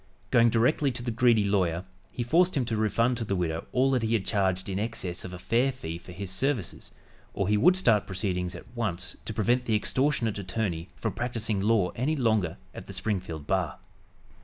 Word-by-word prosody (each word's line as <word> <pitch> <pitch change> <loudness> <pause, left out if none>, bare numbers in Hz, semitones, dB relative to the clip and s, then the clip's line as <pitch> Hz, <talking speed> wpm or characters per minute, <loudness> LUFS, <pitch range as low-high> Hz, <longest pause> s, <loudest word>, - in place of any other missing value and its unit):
Going 115 0 +6
directly 125 +6 +2
to 120 - -5
the 120 - -2
greedy 115 -1 +4
lawyer, 95 -3 +1 0.3
he 120 - -3
forced 170 +7 +3
him 130 - +1
to 115 -1 -2
refund 115 +3 +1
to 115 - -2
the 100 -3 -1
widow 85 -3 -2
all 130 +2 +3
that 130 -2 +2
he 115 0 0
had 100 - -1
charged 95 -3 0
in 95 0 -2
excess 100 -5 -3
of 90 - -7
a 90 - -6
fair 120 +8 +1
fee 85 -10 -6
for 90 - -12
his 95 +1 -4
services, 120 0 -1 0.5
or 100 - 0
he 105 - +3
would 180 - +5
start 115 - +3
proceedings 90 -2 -2
at - - -9
once 95 -6 -2
to - - -4
prevent 120 +4 +2
the 110 - +1
extortionate 115 -1 +1
attorney 90 -3 -3
from - - -3
practicing 115 -4 -2
law 105 -3 +3
any 140 +7 -1
longer 110 - +1 0.2
at - - -9
the - - -8
Springfield 90 -8 -3
bar. 95 -2 0
110 Hz, 205 wpm, -28 LUFS, 95-120 Hz, 0.5 s, Going